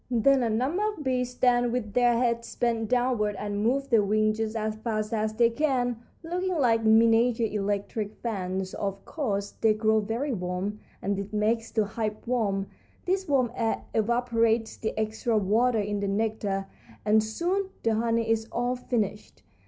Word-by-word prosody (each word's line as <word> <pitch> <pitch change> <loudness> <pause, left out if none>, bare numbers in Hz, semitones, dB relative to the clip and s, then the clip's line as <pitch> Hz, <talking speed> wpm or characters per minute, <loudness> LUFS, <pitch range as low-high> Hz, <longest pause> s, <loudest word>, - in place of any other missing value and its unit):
"Then 255 +3 +4
a 235 - +1
number 260 - 0
of 415 -8 -7
bees 250 -2 0
stand 245 -1 +2
with 225 -4 -3
their 245 -1 +4
heads 235 -1 -1
bent 230 -2 0
downward 245 -4 +1
and 205 0 -3
move 270 +4 0
their 225 -2 +6
wings 215 +1 +1
just 220 0 -2
as 215 -1 -1
fast 215 -1 -2
as 215 0 -1
they 235 +1 +4
can, 245 -3 0 0.3
looking 360 +2 -2
like 230 -5 +3
miniature 225 +1 +4
electric 205 0 -2
fans. 190 -4 -3
Of 195 -1 -4
course 205 -10 -2
they 220 -1 +4
grow 220 0 +3
very 230 +7 -2
warm, 185 +2 -3 0.2
and 200 +1 0
this 200 +1 -5
makes 220 +2 0
the 220 -2 +1
hive 215 0 -3
warm. 210 -5 0 0.4
This 380 +1 0
warm 255 -5 +2
air 225 -1 -1
evaporates 230 0 +1
the 220 - -4
extra 220 +1 0
water 225 +4 +2
in 205 0 -1
the 200 - -1
nectar, 200 -1 -1 0.4
and 215 +1 +4
soon 355 - -1
the 225 - +2
honey 230 +1 +1
is 225 0 +1
all 245 +1 0
finished. 210 - -3
225 Hz, 170 wpm, -27 LUFS, 210-245 Hz, 0.4 s, their